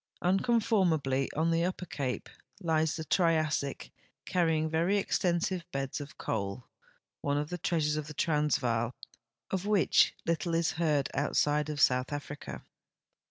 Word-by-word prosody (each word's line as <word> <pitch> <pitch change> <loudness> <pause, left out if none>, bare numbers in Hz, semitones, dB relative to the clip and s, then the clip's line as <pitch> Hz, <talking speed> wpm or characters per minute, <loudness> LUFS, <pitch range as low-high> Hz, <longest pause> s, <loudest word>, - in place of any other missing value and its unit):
Unconformably 180 - +2
on 165 +2 +2
the 165 0 +2
Upper 180 0 -2
Cape 135 -6 -3 0.3
lies 160 -4 +1
the 160 - -4
Triassic, 155 -4 +1 0.3
carrying 165 -4 +1
very 165 +5 +1
extensive 180 -2 0
beds 135 +1 -3
of 145 - -10
coal, 100 +2 -3 0.6
one 145 0 0
of 150 +2 -2
the 180 - -3
treasures 155 -3 0
of 155 -1 -4
the 150 - -8
Transvaal 130 -7 +1 0.6
of 190 +1 -1
which 210 -4 +4
little 165 0 0
is 165 -1 +2
heard 150 -5 +1
outside 150 +1 +1
of 150 -1 -3
South 125 0 +3
Africa. 145 0 -6
155 Hz, 135 wpm, -30 LUFS, 145-170 Hz, 0.6 s, which